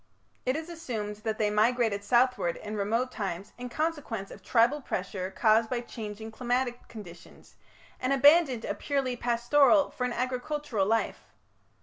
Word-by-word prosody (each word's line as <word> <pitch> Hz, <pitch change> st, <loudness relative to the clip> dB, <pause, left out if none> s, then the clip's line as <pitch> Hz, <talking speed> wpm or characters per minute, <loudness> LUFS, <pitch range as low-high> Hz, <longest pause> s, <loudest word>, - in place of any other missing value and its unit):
It 255 Hz, -, +2 dB
is 320 Hz, +1 st, -4 dB
assumed 235 Hz, -12 st, -5 dB
that 215 Hz, 0 st, -3 dB
they 210 Hz, -1 st, +1 dB
migrated 220 Hz, -1 st, +2 dB
southward 245 Hz, -5 st, +2 dB
in 215 Hz, 0 st, -6 dB
remote 225 Hz, +5 st, 0 dB
times 195 Hz, -3 st, -5 dB
in 250 Hz, 0 st, -5 dB
consequence 285 Hz, -9 st, -3 dB
of 200 Hz, -, -11 dB
tribal 240 Hz, +8 st, +2 dB
pressure 185 Hz, -4 st, -4 dB
caused 220 Hz, +3 st, +3 dB
by 245 Hz, -2 st, -1 dB
changing 220 Hz, -2 st, -7 dB
climatic 245 Hz, +1 st, -2 dB
conditions, 185 Hz, -6 st, -12 dB, 0.5 s
and 255 Hz, -, -1 dB
abandoned 275 Hz, -3 st, +5 dB
a -, -, -1 dB
purely 270 Hz, -3 st, -1 dB
pastoral 245 Hz, +5 st, +3 dB
for 250 Hz, -, -3 dB
an 250 Hz, -, -2 dB
agricultural 255 Hz, -3 st, -2 dB
life. 225 Hz, +1 st, -1 dB
240 Hz, 145 wpm, -28 LUFS, 210-260 Hz, 0.5 s, abandoned